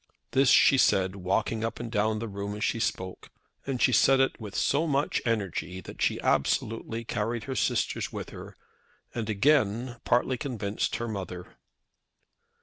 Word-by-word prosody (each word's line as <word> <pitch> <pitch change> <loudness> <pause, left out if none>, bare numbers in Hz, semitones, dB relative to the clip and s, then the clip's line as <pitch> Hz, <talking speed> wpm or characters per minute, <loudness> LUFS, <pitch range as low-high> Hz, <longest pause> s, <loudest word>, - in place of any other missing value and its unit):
This 135 -1 +4
she 135 - +6
said 95 -4 +3
walking 95 +4 -1
up 115 0 -3
and 120 -1 -5
down 110 0 +1
the 115 +2 -4
room 100 0 -5
as 105 - -4
she 115 - 0
spoke, 95 -4 -3 0.4
and 135 -3 -2
she 130 - +4
said 135 +3 +5
it 135 -2 +1
with 105 -3 -7
so 155 +4 +1
much 145 0 0
energy 95 -6 -2
that 90 - -10
she - - +1
absolutely 115 +1 0
carried 115 +2 -2
her 135 - -4
sisters 105 - 0
with - - -6
her - - -10 0.6
and 115 -2 -3
again 120 +1 +2
partly 125 +1 +1
convinced 110 -6 -2
her 120 - -3
mother. 95 -4 -6
115 Hz, 160 wpm, -28 LUFS, 100-125 Hz, 0.6 s, she